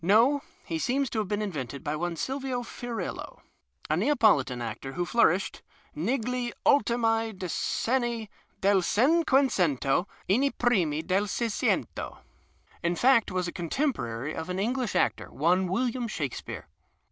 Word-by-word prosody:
No, 230 Hz, -, +4 dB, 0.2 s
he 165 Hz, -, -3 dB
seems 265 Hz, -, 0 dB
to 225 Hz, -, -1 dB
have 210 Hz, -, -1 dB
been 210 Hz, +1 st, -1 dB
invented 140 Hz, -, -5 dB
by 150 Hz, -1 st, -1 dB
one 170 Hz, +2 st, -2 dB
Silvio 260 Hz, -, -2 dB
Fiorillo, 240 Hz, 0 st, -6 dB, 0.5 s
a -, -, +1 dB
Neapolitan 145 Hz, -, +3 dB
actor 120 Hz, +3 st, -5 dB
who 175 Hz, 0 st, -1 dB
flourished 195 Hz, -2 st, +2 dB, 0.2 s
" -, -, -34 dB
negli 250 Hz, -1 st, -1 dB
ultimi 225 Hz, -4 st, +3 dB
dceenni 230 Hz, +5 st, -1 dB, 0.3 s
del 195 Hz, -1 st, +4 dB
Cincjuecento 220 Hz, -, +2 dB, 0.2 s
e 195 Hz, -, +4 dB
nci 280 Hz, 0 st, +2 dB
primi 175 Hz, -11 st, +2 dB
del 195 Hz, +4 st, +1 dB
Sciccnto 225 Hz, +2 st, -1 dB, 0.2 s
'' -, -, -36 dB
— -, -, -30 dB
in 170 Hz, 0 st, +1 dB
fact, 245 Hz, +1 st, +4 dB
was 185 Hz, -1 st, -1 dB
a -, -, -3 dB
contemporary 160 Hz, -, -2 dB
of 160 Hz, -, -5 dB
an 180 Hz, -, -2 dB
English 240 Hz, +3 st, -1 dB
actor, -, -, +1 dB
one 180 Hz, +5 st, +2 dB
\Villiam 240 Hz, +5 st, -1 dB
Shakespeare. 145 Hz, -, -5 dB
210 Hz, 145 wpm, -28 LUFS, 170-245 Hz, 0.5 s, No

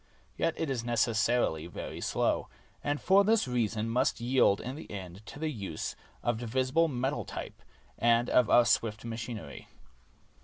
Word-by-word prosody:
Yet 165 Hz, -1 st, 0 dB
it 160 Hz, -4 st, -1 dB
is 120 Hz, -3 st, -2 dB
necessarily 115 Hz, -7 st, +1 dB
very 85 Hz, -, -7 dB
slow; -, -, 0 dB, 0.4 s
and 145 Hz, 0 st, -1 dB
for 195 Hz, +2 st, +5 dB
this 220 Hz, -5 st, +3 dB
reason 115 Hz, -3 st, 0 dB
must 125 Hz, +2 st, +1 dB
yield 120 Hz, -4 st, +3 dB
in 130 Hz, +3 st, -5 dB
the 155 Hz, -, -10 dB
end 95 Hz, -1 st, -8 dB
to -, -, -9 dB
the 155 Hz, +1 st, -2 dB
use 100 Hz, -8 st, -5 dB, 0.3 s
of 120 Hz, -2 st, 0 dB
divisible 130 Hz, +7 st, +1 dB
metal 135 Hz, 0 st, -1 dB
type -, -, -7 dB, 0.4 s
and 120 Hz, +1 st, +3 dB
of 125 Hz, -4 st, +3 dB
our 120 Hz, -, +6 dB
swift 110 Hz, -1 st, +1 dB
machinery. 115 Hz, -, -6 dB
120 Hz, 155 wpm, -30 LUFS, 110-135 Hz, 0.4 s, our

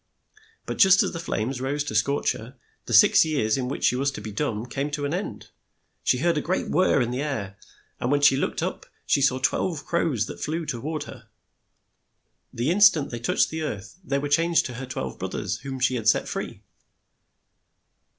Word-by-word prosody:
But -, -, -5 dB
just 190 Hz, -1 st, +7 dB
as -, -, -2 dB
the 170 Hz, -, -5 dB
flames 125 Hz, -5 st, -3 dB
rose 140 Hz, +2 st, -1 dB
to 145 Hz, -, -5 dB
scorch 125 Hz, +7 st, +1 dB
her, 125 Hz, +4 st, -9 dB, 0.3 s
the 120 Hz, -, -3 dB
six 110 Hz, -, +7 dB
years 140 Hz, -9 st, 0 dB
in 130 Hz, -2 st, -2 dB
which 135 Hz, -, -5 dB
she -, -, +3 dB
was 135 Hz, +2 st, +1 dB
to -, -, -6 dB
be 110 Hz, -, -7 dB
dumb 110 Hz, -1 st, -2 dB
came 135 Hz, +4 st, -3 dB
to 145 Hz, 0 st, -3 dB
an 145 Hz, -, -2 dB
end. 185 Hz, +4 st, -5 dB, 0.5 s
She 125 Hz, -, +2 dB
heard 165 Hz, +3 st, +1 dB
a -, -, -3 dB
great 185 Hz, +5 st, -2 dB
whirr 185 Hz, -6 st, +3 dB
in 120 Hz, -, -3 dB
the 125 Hz, +2 st, -2 dB
air, 105 Hz, -9 st, -4 dB, 0.4 s
and 120 Hz, -, -1 dB
when 145 Hz, 0 st, +2 dB
she 145 Hz, -2 st, +6 dB
looked 135 Hz, -, -1 dB
up -, -, -4 dB, 0.2 s
she 140 Hz, -, +2 dB
saw 135 Hz, -1 st, +3 dB
twelve 140 Hz, +3 st, -1 dB
crows 150 Hz, -10 st, 0 dB
that -, -, -9 dB
flew 165 Hz, +2 st, -2 dB
to 125 Hz, -6 st, -4 dB
ward 155 Hz, +3 st, -3 dB
her. -, -, -12 dB, 1.2 s
The 125 Hz, +7 st, -1 dB
in 200 Hz, +4 st, 0 dB
stant 165 Hz, -8 st, +5 dB
they 120 Hz, -, -4 dB
touched 115 Hz, -, +1 dB
the 160 Hz, 0 st, -4 dB
earth, 130 Hz, -, -6 dB
they 140 Hz, -5 st, -1 dB
were 145 Hz, +1 st, -2 dB
changed 165 Hz, +3 st, +2 dB
to 125 Hz, -, -5 dB
her 130 Hz, +2 st, -7 dB
twelve 65 Hz, -, -5 dB
broth -, -, -4 dB
ers -, -, -2 dB
whom 135 Hz, -1 st, -6 dB
she 130 Hz, 0 st, +2 dB
had 115 Hz, -3 st, -2 dB
set -, -, +2 dB
free. -, -, -5 dB
140 Hz, 215 wpm, -25 LUFS, 120-155 Hz, 1.2 s, just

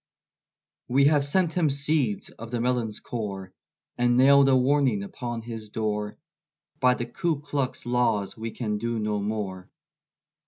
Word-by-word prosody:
We 135 Hz, +3 st, +3 dB
have 145 Hz, -1 st, +4 dB
sent 165 Hz, +3 st, +2 dB
him 170 Hz, -4 st, +2 dB
seeds 140 Hz, -5 st, 0 dB
of 115 Hz, 0 st, -10 dB
the 120 Hz, 0 st, -2 dB
melon's 120 Hz, -3 st, -1 dB
core, 100 Hz, -5 st, -6 dB, 0.5 s
And 120 Hz, 0 st, +3 dB
nailed 140 Hz, +1 st, +6 dB
a 130 Hz, -, +5 dB
warning 130 Hz, -5 st, +2 dB
upon 120 Hz, +3 st, -6 dB
his 115 Hz, -2 st, -7 dB
door; 105 Hz, -1 st, -3 dB, 0.6 s
By 125 Hz, -1 st, +4 dB
the 120 Hz, -, -3 dB
Ku 155 Hz, +5 st, -2 dB
Klux 140 Hz, -3 st, -3 dB
laws 120 Hz, -5 st, 0 dB
we 115 Hz, 0 st, -5 dB
can 105 Hz, -2 st, -3 dB
do 115 Hz, +1 st, -2 dB
no 105 Hz, -1 st, -1 dB
more. 100 Hz, -3 st, -4 dB
120 Hz, 150 wpm, -26 LUFS, 105-140 Hz, 0.6 s, nailed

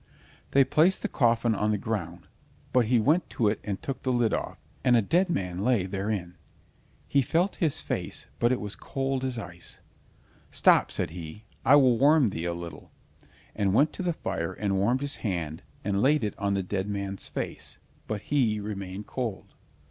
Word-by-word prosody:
They 140 Hz, -, +5 dB
placed 155 Hz, +8 st, +3 dB
the -, -, +1 dB
coffin 115 Hz, -2 st, +2 dB
on 105 Hz, +1 st, 0 dB
the 105 Hz, -, +2 dB
ground, 90 Hz, -5 st, -4 dB, 0.5 s
but 125 Hz, -2 st, +4 dB
he 120 Hz, 0 st, +4 dB
went 155 Hz, +9 st, +2 dB
to 115 Hz, -, +1 dB
it 105 Hz, -, -1 dB
and 100 Hz, -2 st, -3 dB
took 135 Hz, -, -5 dB
the 130 Hz, -, 0 dB
lid 120 Hz, -3 st, +2 dB
off, -, -, -3 dB, 0.3 s
and 125 Hz, -2 st, +5 dB
a -, -, +4 dB
dead 175 Hz, -, +2 dB
man 90 Hz, -, -2 dB
lay 110 Hz, -2 st, +2 dB
therein. 95 Hz, -2 st, -3 dB, 0.7 s
He 140 Hz, -, +3 dB
felt 170 Hz, +9 st, +1 dB
his 160 Hz, -5 st, 0 dB
face, -, -, -4 dB
but 120 Hz, +1 st, +3 dB
it 130 Hz, -, +1 dB
was 105 Hz, 0 st, -4 dB
cold 135 Hz, -1 st, -2 dB
as 130 Hz, -2 st, -2 dB
ice. 85 Hz, -6 st, -9 dB, 0.7 s
"Stop," -, -, +4 dB
said -, -, -1 dB
he, 85 Hz, +4 st, -8 dB, 0.2 s
"I 140 Hz, -, +7 dB
will 130 Hz, -5 st, +5 dB
warm 145 Hz, -2 st, +5 dB
thee 85 Hz, -3 st, -4 dB
a, 85 Hz, -, -1 dB
little," 85 Hz, -3 st, -8 dB, 0.7 s
and 100 Hz, -2 st, +1 dB
went 145 Hz, +5 st, +4 dB
to -, -, -5 dB
the 175 Hz, -2 st, 0 dB
fire 95 Hz, -, -3 dB
and 100 Hz, -2 st, -1 dB
warmed 120 Hz, +7 st, +2 dB
his 145 Hz, 0 st, -3 dB
hand 85 Hz, -7 st, -3 dB, 0.2 s
and 100 Hz, 0 st, 0 dB
laid 145 Hz, 0 st, +3 dB
it 105 Hz, -, -1 dB
on 100 Hz, 0 st, 0 dB
the 95 Hz, -, 0 dB
dead 95 Hz, +2 st, -2 dB
man's 100 Hz, -1 st, -4 dB
face, -, -, -5 dB, 0.3 s
but 105 Hz, -2 st, -3 dB
he 120 Hz, -7 st, +1 dB
remained 100 Hz, -1 st, -5 dB
cold. 120 Hz, -6 st, -5 dB
110 Hz, 190 wpm, -27 LUFS, 95-130 Hz, 0.7 s, I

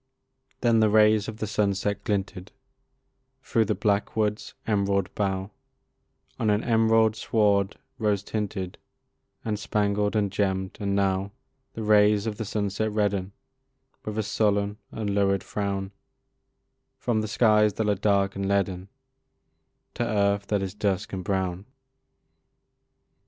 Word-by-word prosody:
Then 115 Hz, -1 st, +4 dB
the 110 Hz, -1 st, +4 dB
rays 105 Hz, 0 st, +4 dB
of 110 Hz, -, -6 dB
the 110 Hz, -, -3 dB
sunset 100 Hz, -1 st, -1 dB
glinted 95 Hz, -2 st, -3 dB, 0.9 s
Through 115 Hz, -1 st, +1 dB
the -, -, 0 dB
blackwoods' 105 Hz, 0 st, -1 dB
emerald 100 Hz, -3 st, 0 dB
bough 95 Hz, -1 st, -2 dB, 0.9 s
On 110 Hz, -, +1 dB
an 105 Hz, +1 st, +2 dB
emerald 115 Hz, -1 st, +3 dB
sward, 100 Hz, -3 st, +1 dB, 0.2 s
rose 105 Hz, -2 st, +1 dB
tinted, 100 Hz, -4 st, -4 dB, 0.7 s
And 105 Hz, -2 st, -1 dB
spangled, 105 Hz, 0 st, 0 dB
and 100 Hz, -2 st, +1 dB
gemm'd; 95 Hz, -1 st, -1 dB
and 100 Hz, -1 st, -1 dB
now 100 Hz, 0 st, 0 dB, 0.4 s
The 110 Hz, -, -5 dB
rays 105 Hz, 0 st, +4 dB
of 110 Hz, -2 st, -3 dB
the 110 Hz, -, -3 dB
sunset 105 Hz, +1 st, -1 dB
redden 100 Hz, -2 st, -1 dB, 0.7 s
With 105 Hz, 0 st, -5 dB
a 110 Hz, -, +1 dB
sullen 105 Hz, -1 st, 0 dB
and 110 Hz, -2 st, -4 dB
lurid 100 Hz, -1 st, +2 dB
frown, 100 Hz, -1 st, -3 dB, 1.1 s
From 110 Hz, -3 st, 0 dB
the 110 Hz, -, -3 dB
skies 105 Hz, -1 st, +3 dB
that 110 Hz, -, -1 dB
are 105 Hz, -, +3 dB
dark 100 Hz, -1 st, +1 dB
and 100 Hz, 0 st, -2 dB
leaden, 95 Hz, -1 st, 0 dB, 1.0 s
To -, -, -2 dB
earth 100 Hz, -3 st, +1 dB
that 100 Hz, -2 st, 0 dB
is 95 Hz, -, -4 dB
dusk 100 Hz, 0 st, -2 dB
and 95 Hz, -1 st, -3 dB
brown. 95 Hz, 0 st, -2 dB
105 Hz, 130 wpm, -26 LUFS, 100-110 Hz, 1.1 s, Then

